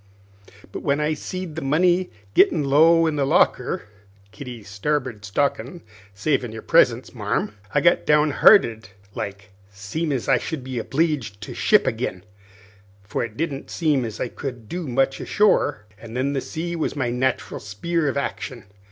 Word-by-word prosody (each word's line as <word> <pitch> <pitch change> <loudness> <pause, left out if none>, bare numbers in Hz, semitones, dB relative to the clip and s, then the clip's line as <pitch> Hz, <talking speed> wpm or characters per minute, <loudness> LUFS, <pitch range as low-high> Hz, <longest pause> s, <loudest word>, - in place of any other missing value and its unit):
But - - -6
when 140 0 +1
I 150 +1 +1
seed 180 +1 -6
the 160 - -4
money 175 +6 +2 0.2
gittin' 155 +6 +4
low 165 +4 +5
in 155 -2 0
the 140 - +2
locker 135 - +2 0.5
Kitty's 120 -2 -9
starboard 120 +1 -2
stockin', 135 - -2 0.3
savin' 120 +2 0
your 110 0 -8
presence, - - +3
marm - - -2 0.2
I - - +2
got 170 - +4
down 150 0 +4
hearted 115 - +5 0.2
like, 100 +1 -6 0.2
seem' 100 +12 -4
as 130 -4 -2
I - - +4
should 155 -5 -5
be 130 -2 -4
obleeged 135 -6 -1
to - - -7
ship 210 - +3
agin, 115 -7 -2 0.8
for 95 - -3
it 115 -2 -7
didn't 145 -4 -3
seem 150 -6 +1
as 110 -3 -6
I - - -1
could 120 -3 -7
do 175 +2 -5
much 135 +2 +1
ashore. 145 - +2
An' 115 0 -10
then 135 +3 0
the 135 - -1
sea 170 +4 -4
was 160 - -2
my 125 -4 -1
nat'ral 130 +1 -1
spear 150 +11 -2
of 140 - -1
action. 130 -4 -4
135 Hz, 165 wpm, -23 LUFS, 115-155 Hz, 0.8 s, low